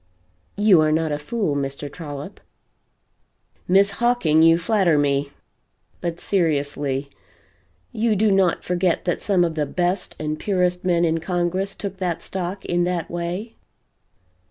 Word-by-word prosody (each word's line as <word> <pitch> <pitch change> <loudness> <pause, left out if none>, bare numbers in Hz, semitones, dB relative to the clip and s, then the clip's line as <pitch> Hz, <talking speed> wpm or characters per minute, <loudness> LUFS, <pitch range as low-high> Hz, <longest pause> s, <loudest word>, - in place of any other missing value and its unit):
You 205 -5 +5
are 155 0 +2
not 160 0 +1
a 145 - -2
fool, 175 -1 -2
Mr. 140 +1 -3
Trollop." 145 -2 -8 1.3
"Miss 195 +2 +4
Hawking 200 -9 +2
you 165 0 +6
flatter 175 -2 +2
me. 140 -1 +1 0.7
But 170 -1 -4
seriously, 145 -6 -1 0.8
you 220 0 +1
do 210 +1 +3
not 190 -3 +2
forget 180 0 0
that 175 - -1
some 190 -4 +2
of 165 - -2
the 150 -2 -1
best 180 +4 -2
and 155 0 -3
purest 180 -3 0
men 175 -2 +2
in 165 0 +1
Congress 180 +3 -1
took 195 -2 -6
that 180 -3 -2
stock 190 +1 -5
in 175 0 +1
that 175 -2 -2
way?" 175 +6 -4
175 Hz, 140 wpm, -22 LUFS, 155-190 Hz, 1.3 s, you